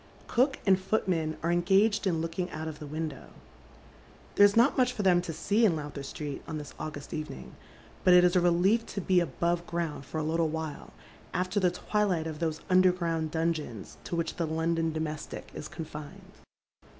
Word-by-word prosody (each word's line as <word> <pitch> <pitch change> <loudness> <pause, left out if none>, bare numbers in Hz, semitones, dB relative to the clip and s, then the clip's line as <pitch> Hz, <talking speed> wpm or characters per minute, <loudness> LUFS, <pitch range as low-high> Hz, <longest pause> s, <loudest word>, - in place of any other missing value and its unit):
Cook 265 +3 +2
and 190 -2 +5
footman 180 -6 0
are 170 - +1
engaged 195 +5 +3
in 165 -3 +1
looking 175 +2 -3
out 160 -1 -5
of 155 -1 -6
the 150 - -7
window. 155 -2 -5 1.1
There 205 - +8
is 200 - -3
not 235 +5 +5
much 250 -2 +3
for 210 - -3
them 180 -2 +5
to 175 - -5
see 200 +8 +1
in 195 -7 +5
Lowther 145 -2 -5
Street 140 +1 -6
on 160 - -4
thia 150 - -6
August 150 -2 -6
evening, 150 - -6 0.5
but 180 - +7
it 180 - +7
is 180 +1 +4
a 180 - +5
relief 180 +6 +3
to 200 - -4
be 185 -1 +3
above 170 +2 0
ground 170 -4 -3
for 155 +4 -5
a - - -1
littie 160 0 +1
wliile, 160 -2 -5 0.5
after 185 +3 0
the 185 -2 +3
twilight 185 -2 0
of 155 -2 -5
those 160 -2 -2
underground 180 -3 +2
dungeons 160 -8 -3
to - - -3
which 170 -1 -2
the 170 - 0
London 165 +1 0
domestic 155 -1 -5
is 150 - -6
confined. 150 -3 -9
165 Hz, 185 wpm, -29 LUFS, 155-185 Hz, 1.1 s, There